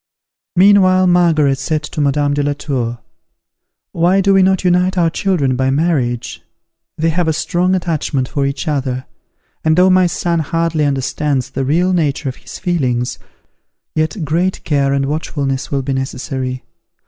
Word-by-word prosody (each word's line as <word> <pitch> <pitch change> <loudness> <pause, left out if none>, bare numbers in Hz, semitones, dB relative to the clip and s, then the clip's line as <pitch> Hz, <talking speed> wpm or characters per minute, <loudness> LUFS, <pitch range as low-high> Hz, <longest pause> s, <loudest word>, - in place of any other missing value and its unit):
Meanwhile 185 0 +5
Margaret 165 -6 +3
said 155 -2 -2
to 150 - -4
Madame 145 0 +1
de 145 - 0
la 145 0 0
Tour, 125 -5 -3 0.9
"Why 175 +3 +2
do 195 0 +3
we 195 - +5
not 190 0 +2
unite 180 +1 +2
our 165 -2 +2
children 160 -9 0
by 130 +1 +1
marriage? 135 -5 -1 0.6
They 165 +1 +1
have 170 +1 0
a 160 - +2
strong 180 +4 0
attachment 155 -7 -1
for 140 +1 -1
each 140 +4 -4
other, 130 -3 -2 0.6
and 155 +1 +2
though 185 +1 +5
my 185 -1 +4
son 170 0 -1
hardly 165 0 0
understands 135 0 -1
the 135 0 -2
real 175 +7 +2
nature 150 -5 0
of 130 - -8
his - - -10
feelings, 125 -9 -1 0.7
yet 155 +2 -1
great 175 +5 -1
care 140 -2 +1
and 140 0 +1
watchfulness 140 -2 -3
will 140 -1 -1
be 135 +1 -2
necessary. 130 -1 -4
150 Hz, 160 wpm, -16 LUFS, 135-175 Hz, 0.9 s, Meanwhile